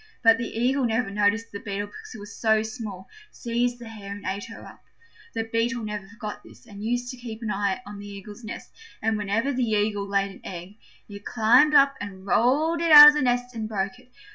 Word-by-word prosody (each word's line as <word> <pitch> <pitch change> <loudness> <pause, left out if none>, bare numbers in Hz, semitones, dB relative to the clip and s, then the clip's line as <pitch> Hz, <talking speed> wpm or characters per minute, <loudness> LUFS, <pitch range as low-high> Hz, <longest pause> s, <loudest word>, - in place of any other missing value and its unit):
But 225 0 +6
the 235 - -3
Eagle 255 +4 0
never 225 -2 -1
noticed 210 +3 0
the 200 - -6
Beetle 205 -1 -4
because 205 +4 -12
it - - -9
was 205 +2 -10
so 220 -1 +2
small, 220 -5 -7 0.2
seized 240 0 -2
the 240 -1 -11
hare 210 -3 -9
and 205 - -10
ate 195 +4 -3
her 225 -1 -11
up. - - -14 0.5
The 225 - -1
Beetle 230 +2 -1
never 210 -2 -6
forgot 215 0 -8
this, - - -17
and 205 0 -11
used 245 +2 -2
to 255 - -10
keep 230 -2 -8
an 215 - -2
eye 200 +3 -1
on 205 0 -9
the 205 - -9
Eagle's 205 +3 -10
nest, 215 - -8 0.3
and 220 0 0
whenever 215 +6 -1
the 255 - -2
Eagle 205 -2 0
laid 200 0 0
an - - -15
egg 185 +4 -9 0.3
it 200 -1 -11
climbed 245 +8 +4
up 275 0 +6
and 195 -2 -8
rolled 300 +11 +2
it 335 -1 +1
out 295 0 +13
of - - +2
the 300 - -1
nest 245 -1 0
and 220 -2 -5
broke 200 +2 -3
it. 250 0 -23
220 Hz, 225 wpm, -25 LUFS, 205-245 Hz, 0.5 s, out